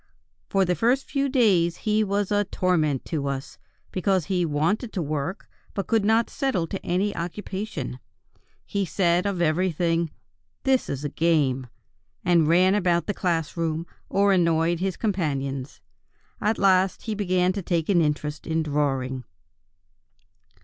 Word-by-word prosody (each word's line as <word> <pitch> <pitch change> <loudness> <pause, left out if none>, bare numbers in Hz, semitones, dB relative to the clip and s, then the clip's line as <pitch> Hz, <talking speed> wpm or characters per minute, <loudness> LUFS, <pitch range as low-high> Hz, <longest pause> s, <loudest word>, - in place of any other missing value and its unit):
"For 195 -1 +3
the 180 - +1
first 240 - +1
few 275 -1 -1
days 195 -10 +3
he 215 0 +3
was 200 0 -1
a 205 0 +2
torment 155 -8 0
to 150 -5 -2
us, 135 -1 -5 0.3
because 185 -2 +1
he 180 -3 0
wanted 165 +10 0
to 185 - -1
work, 150 +5 -3 0.3
but 195 - -2
could 225 -2 +2
not 225 +2 +3
settle 265 - -1
to 195 - -5
any 190 +4 0
occupation. 175 - -5 0.7
He 200 -1 -1
said 180 0 +1
of 185 -3 0
everything: 170 0 +1 0.5
'This 265 -1 +2
is 140 +1 -3
a - - -1
game,' 140 -5 +1 0.6
and 170 -3 +4
ran 180 +4 +5
about 175 -4 +2
the 205 - -1
class 170 -5 -1
room, 165 -1 -1 0.2
or 200 0 +3
annoyed 170 -1 +2
his 190 -1 -2
companions. 140 - -2 0.6
At 215 +1 +1
last 190 -1 +3
he 220 - -2
began 185 -3 +1
to 200 - -3
take 170 -3 -1
an 185 -4 +4
interest 150 -1 -2
in 160 0 0
drawing." 135 -4 -1
175 Hz, 150 wpm, -25 LUFS, 155-200 Hz, 0.7 s, ran